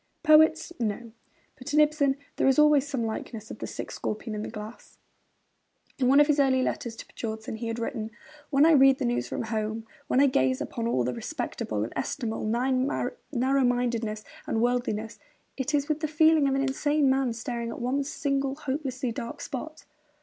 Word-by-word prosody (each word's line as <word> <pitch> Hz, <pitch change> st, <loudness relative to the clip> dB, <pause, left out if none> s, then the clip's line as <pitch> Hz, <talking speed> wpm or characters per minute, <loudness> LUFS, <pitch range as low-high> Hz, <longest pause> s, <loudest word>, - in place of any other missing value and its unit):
Poets, 315 Hz, +2 st, +5 dB
no; 230 Hz, +1 st, -3 dB, 0.5 s
but 285 Hz, +3 st, -4 dB
in -, -, +6 dB
Ibsen 295 Hz, -2 st, +3 dB, 0.2 s
there -, -, +2 dB
is 270 Hz, -, +4 dB
always 300 Hz, -2 st, +5 dB
some 260 Hz, -6 st, -2 dB
likeness 220 Hz, 0 st, -5 dB
of -, -, -8 dB
the -, -, -4 dB
sick -, -, -6 dB
scorpion 215 Hz, +1 st, -4 dB
in 210 Hz, -, -3 dB
the -, -, -5 dB
glass. 215 Hz, +1 st, -10 dB, 1.0 s
In 255 Hz, -, +2 dB
one 275 Hz, +3 st, +6 dB
of 295 Hz, -, +7 dB
his 295 Hz, -1 st, +2 dB
early 260 Hz, -2 st, +3 dB
letters 235 Hz, -2 st, -3 dB
to -, -, -9 dB
Björnson, 220 Hz, -1 st, -6 dB
he 230 Hz, -, -4 dB
had 230 Hz, 0 st, -3 dB
written: 230 Hz, -1 st, -3 dB, 0.4 s
'When 280 Hz, +1 st, +5 dB
I 330 Hz, -, +6 dB
read 270 Hz, -3 st, +6 dB
the 270 Hz, -, -2 dB
news 240 Hz, 0 st, 0 dB
from -, -, -3 dB
home, 220 Hz, 0 st, -3 dB, 0.2 s
when 255 Hz, -, +2 dB
I 280 Hz, -, +6 dB
gaze 130 Hz, -, +2 dB
upon 230 Hz, -1 st, -3 dB
all 130 Hz, -, +1 dB
that 125 Hz, +1 st, -1 dB
respectable, 105 Hz, -2 st, -3 dB
estimable 225 Hz, -3 st, -3 dB
narrow 255 Hz, -, 0 dB, 0.5 s
mindedness 235 Hz, -3 st, 0 dB, 0.2 s
and 225 Hz, -, 0 dB
worldliness, 230 Hz, -2 st, -1 dB, 0.4 s
it 280 Hz, +3 st, -1 dB
is 285 Hz, 0 st, 0 dB
with 305 Hz, -1 st, 0 dB
the 310 Hz, -, -1 dB
feeling 315 Hz, -1 st, +4 dB
of 270 Hz, -, +1 dB
an 275 Hz, -, +1 dB
insane 290 Hz, +2 st, +1 dB
man 265 Hz, -1 st, +2 dB
staring 235 Hz, +1 st, -4 dB
at -, -, -6 dB
one 260 Hz, +4 st, 0 dB
single, 275 Hz, -1 st, -1 dB
hopelessly 265 Hz, -3 st, -3 dB
dark 235 Hz, 0 st, -6 dB
spot.' 310 Hz, +4 st, -7 dB
255 Hz, 185 wpm, -27 LUFS, 225-280 Hz, 1.0 s, of